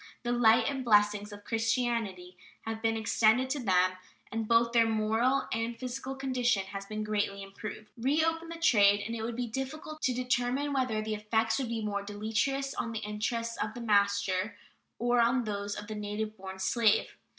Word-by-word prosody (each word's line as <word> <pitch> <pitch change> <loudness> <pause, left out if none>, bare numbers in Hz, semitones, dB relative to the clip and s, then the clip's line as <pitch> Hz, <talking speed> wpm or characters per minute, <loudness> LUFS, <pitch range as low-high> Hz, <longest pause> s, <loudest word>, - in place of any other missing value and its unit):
The 240 - -1
light 230 -1 +5
and 275 -1 -1
the - - -4
blessings 210 -1 +3
of 205 0 -10
Christianity 225 -6 -1 0.3
have 225 0 -5
been 225 0 +1
extended 225 +3 +3
to 290 - -1
them, 185 -5 +3 0.4
and 225 0 -2
both 230 +1 +4
their 230 -1 +4
moral 225 +5 +1
and 225 +1 -2
physical 255 +2 -5
condition 255 -6 +1
has 195 +1 -7
been 215 0 -3
greatly 205 -2 -1
improved. 210 +2 -8
Reopen 320 +7 0
the 335 - -5
trade 205 -11 +4
and 230 - -3
it 225 - -4
would 230 +1 -3
be 245 +1 -2
difficult 270 +6 -5
to 260 - +2
determine 250 +3 0
whether 250 -5 0
the 215 0 -2
effect 220 +1 0
would 260 - -2
be 225 -2 -2
more 200 -1 -1
deleterious 220 +7 -1
on 230 - -3
the 225 - -2
interests 230 +2 -3
of 215 0 -6
the 240 - -6
master 200 -2 +1 0.4
or 240 +1 +2
on 240 +2 +3
those 205 -1 -3
of 210 - -6
the 215 - -6
native 210 +1 -4
born 190 -1 -8
slave. 210 +3 +2
225 Hz, 185 wpm, -30 LUFS, 210-245 Hz, 0.4 s, light